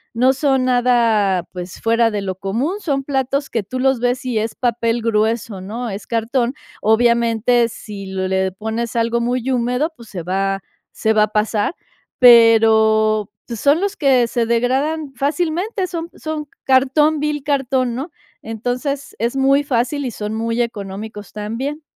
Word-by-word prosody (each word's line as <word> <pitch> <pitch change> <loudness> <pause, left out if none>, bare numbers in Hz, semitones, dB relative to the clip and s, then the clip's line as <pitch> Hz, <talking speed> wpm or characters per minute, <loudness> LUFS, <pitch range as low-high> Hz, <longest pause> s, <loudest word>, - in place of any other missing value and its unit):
No 255 +3 +4
son 270 -2 +1
nada, 230 -7 +2
pues, 180 -1 -7
fuera 230 0 +3
de 210 -2 -3
lo 190 - -2
común, 225 - -2
son 280 -7 -1
platos 275 0 -1
que 225 - 0
tú 255 +6 -6
los 265 -2 +2
ves 245 +1 -1
y 245 -4 0
es 220 +1 -3
papel 235 -1 0
grueso, 220 -2 0
¿no? 230 +5 -5
Es 200 +2 -7
cartón. 235 +3 0 0.3
Obviamente, 235 +1 +3
si 205 -3 -9
le 190 0 -1
pones 220 +4 -4
algo 235 0 +1
muy 245 +2 -1
húmedo, 250 +6 0
pues, 235 -5 -14
se 175 -4 -6
va 195 +2 -1 0.3
se 220 0 0
va 215 -1 +4
a - - +2
pasar, 215 - 0 0.4
pero, 220 -3 +5 0.2
pues, 235 -3 -6
son 290 - +3
los 400 0 -1
que 265 -5 +3
se 235 -1 -1
degradan 270 +5 0
fácilmente, 345 - -1
son 335 -2 -5
son 310 -1 -5 0.2
cartón 275 +4 +3
vil 295 -1 -2
cartón, 265 -4 0
¿no? 280 +6 -5 0.3
Entonces 250 +5 -4
es 235 +4 -1
muy 275 +2 +3
fácil 270 +1 -1
y 245 - -3
son 210 0 -5
muy 230 +2 -1
económicos 205 -1 -7
también. 235 +9 -4
235 Hz, 160 wpm, -19 LUFS, 220-270 Hz, 0.4 s, pero